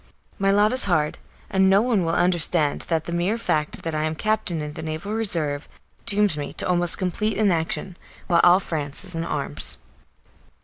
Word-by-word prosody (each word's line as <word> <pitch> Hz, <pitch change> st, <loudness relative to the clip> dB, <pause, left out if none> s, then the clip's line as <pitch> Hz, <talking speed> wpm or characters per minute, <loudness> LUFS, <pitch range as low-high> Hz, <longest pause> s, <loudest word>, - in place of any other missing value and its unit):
My 195 Hz, 0 st, +2 dB
lot 205 Hz, +3 st, +3 dB
is 255 Hz, -, +6 dB
hard, 155 Hz, -5 st, 0 dB, 0.3 s
and 190 Hz, -1 st, +2 dB
no 195 Hz, +3 st, +4 dB
one 230 Hz, -7 st, +1 dB
will 165 Hz, 0 st, -1 dB
understand 170 Hz, -4 st, +2 dB
that 165 Hz, -2 st, 0 dB
the 170 Hz, -, -7 dB
mere 175 Hz, +6 st, 0 dB
fact 155 Hz, -9 st, -2 dB
that 165 Hz, -, -3 dB
I 155 Hz, 0 st, -1 dB
am 155 Hz, -, -2 dB
a -, -, -9 dB
captain 215 Hz, -3 st, -1 dB
in 150 Hz, 0 st, -5 dB
the -, -, -7 dB
Naval 160 Hz, +6 st, -5 dB
Reserve 165 Hz, -10 st, -1 dB, 0.4 s
dooms 205 Hz, -5 st, +3 dB
me 145 Hz, -, -5 dB
to -, -, -1 dB
almost 175 Hz, -1 st, +3 dB
complete 195 Hz, +3 st, -2 dB
inaction, 185 Hz, -2 st, -1 dB, 0.3 s
while 170 Hz, -2 st, +3 dB
all 175 Hz, +1 st, +6 dB
France 150 Hz, -2 st, -3 dB
is 185 Hz, -, -3 dB
in 165 Hz, 0 st, -3 dB
arms. 140 Hz, -, -1 dB
175 Hz, 190 wpm, -23 LUFS, 155-200 Hz, 0.4 s, is